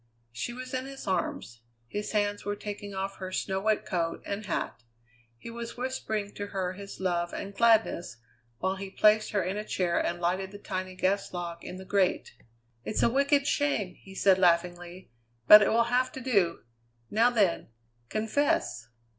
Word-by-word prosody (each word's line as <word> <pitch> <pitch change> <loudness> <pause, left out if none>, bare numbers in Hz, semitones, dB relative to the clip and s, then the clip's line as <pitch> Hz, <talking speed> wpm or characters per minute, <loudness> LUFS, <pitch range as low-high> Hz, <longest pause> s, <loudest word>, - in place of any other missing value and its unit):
She 120 - -4
was 255 +2 -8
in 260 +1 -2
his 270 0 -9
arms; 170 - -2 0.3
his 205 - -4
hands 205 -1 0
were 205 +1 -2
taking 205 -1 -7
off 195 +1 -3
her 185 -1 -6
snow 190 0 -1
wet 215 +1 +1
coat 170 -2 -2
and 205 +1 -4
hat. 145 - -3 0.6
He 230 - -9
was 235 0 -7
whispering 220 -5 -3
to 205 - -5
her 190 -2 -2
his 200 +1 -9
love 175 -2 -1
and 200 0 -5
gladness 220 - +2 0.4
while 190 +1 -1
he 195 0 -6
placed 215 +2 +4
her 205 -3 0
in 185 +3 -2
a 210 - -3
chair 180 -4 0
and 175 - -2
lighted 185 +2 0
the 205 - -10
tiny 185 -2 -5
gas 190 +2 0
log 170 -1 -5
in - - -7
the 190 - -9
grate. 190 -1 +1 0.5
"It's 215 - -1
a 235 - +4
wicked 280 +2 +3
shame!" 250 -13 0
he 190 +1 -15
said 190 -1 +4
laughingly; 175 0 +1 0.4
"but 210 +6 +11
it 205 - +3
will 230 +1 +4
have 255 +1 +2
to - - -6
do. 200 -10 +1 0.5
Now 230 +3 +4
then, 205 -8 +1 0.4
confess!" 215 - 0
200 Hz, 180 wpm, -29 LUFS, 185-220 Hz, 0.6 s, but